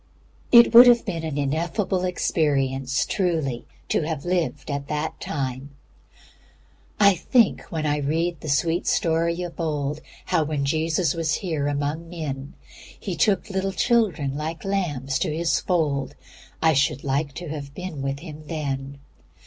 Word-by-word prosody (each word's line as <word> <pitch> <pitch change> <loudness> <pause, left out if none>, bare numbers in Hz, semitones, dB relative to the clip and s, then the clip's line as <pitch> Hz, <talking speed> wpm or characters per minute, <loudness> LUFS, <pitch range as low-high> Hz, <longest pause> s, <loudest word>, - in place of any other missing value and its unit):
It 235 -1 +8
would 240 +2 +11
have 240 -1 +5
been 170 -6 -3
an 155 -3 -3
ineffable 170 +6 -1
experience 135 -6 0
truly 160 - -1 0.2
to - - +2
have 155 -1 -4
lived 175 -4 -1
at 140 0 -3
that 150 +1 -3
time 135 -1 -4 1.2
"I 200 -1 +7
think 235 +4 +1
when 160 -3 -2
I 150 0 +1
read 160 +4 -1
the 155 - -6
sweet 165 +5 +1
story 170 +1 +1
of 175 0 -8
old, 150 -2 -2 0.2
How 175 -4 +2
when 150 -2 -2
Jesus 160 +2 +1
was 160 -3 0
here 160 -6 -2
among 145 +3 -2
men, 145 -5 -6 0.4
He 190 -4 -4
took 195 +6 +2
little 190 0 -1
children 190 - +1
like 155 +2 -5
lambs 145 -10 -1
to - - 0
His 170 0 +1
fold, 145 -7 -1 0.5
I 160 -1 +5
should 140 -1 +1
like 140 +1 -1
to 175 -2 -6
have 140 -2 -7
been 180 -6 -6
with 135 +1 -3
Him 155 -2 -10
then. 140 -3 -4
155 Hz, 150 wpm, -24 LUFS, 140-175 Hz, 1.2 s, would